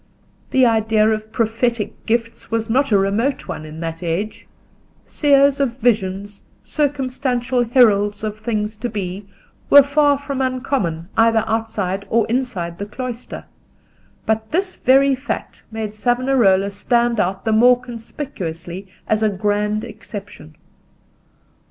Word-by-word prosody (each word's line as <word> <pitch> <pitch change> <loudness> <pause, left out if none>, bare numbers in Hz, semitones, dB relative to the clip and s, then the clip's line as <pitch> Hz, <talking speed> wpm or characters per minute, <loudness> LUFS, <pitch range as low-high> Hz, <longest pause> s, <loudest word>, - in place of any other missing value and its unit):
The 260 -1 +4
idea 220 -2 +3
of 215 0 -2
prophetic 230 0 -1
gifts 230 0 -2
was 225 0 -1
not 270 +1 +2
a 205 - +5
remote 210 +8 0
one 155 - -6
in 155 +1 -9
that 165 0 -5
age: 180 +5 -3 0.6
seers 280 -1 +3
of 255 -3 0
visions, 205 -4 -1 0.2
circumstantial 260 -4 -1
heralds 210 -4 +3
of 215 0 -4
things 215 -1 -2
to 240 +3 -3
be, 195 -2 -5 0.4
were 285 0 +9
far 285 0 +3
from 280 -1 -4
uncommon 255 - -1
either 225 -1 +4
outside 210 -4 -2
or 230 -1 +2
inside 225 -9 -2
the 200 - -4
cloister; 245 +2 -6 0.8
but 220 0 -1
this 370 +3 -1
very 270 +2 +4
fact 260 +2 -5
made 220 -2 -5
Savonarola 225 -4 +2
stand 235 +3 +1
out 190 +2 -1
the 220 - +2
more 245 +3 +5
conspicuously 210 - -7 0.2
as 215 0 +1
a 215 - +3
grand 210 +1 -1
exception. 205 -7 -10
225 Hz, 130 wpm, -20 LUFS, 205-250 Hz, 0.8 s, were